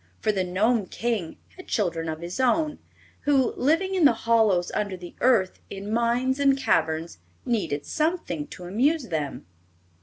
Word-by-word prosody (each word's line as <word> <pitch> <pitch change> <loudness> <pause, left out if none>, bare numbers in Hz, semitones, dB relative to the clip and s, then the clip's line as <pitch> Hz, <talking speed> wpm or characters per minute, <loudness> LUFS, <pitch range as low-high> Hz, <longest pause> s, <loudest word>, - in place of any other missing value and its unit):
For 215 - +1
the 195 -3 0
Gnome 205 +4 +1
King 220 -8 -3 0.2
had 370 - -11
children 165 -6 -1
of 160 +1 -5
his 175 +7 -6
own, 300 +4 +1 0.5
who, 275 -3 +3
living 330 +8 +1
in 370 -3 +2
the 280 -5 +7
hollows 215 -6 +3
under 200 -3 -2
the 175 -1 -10
earth, 225 -7 +3
in 200 +2 -5
mines 240 +3 +1
and 275 -1 +4
caverns, 160 - 0 0.3
needed 200 -12 -1
something 310 - -1
to 180 - -10
amuse 250 - +1
them. 150 - -3
220 Hz, 155 wpm, -25 LUFS, 175-265 Hz, 0.5 s, the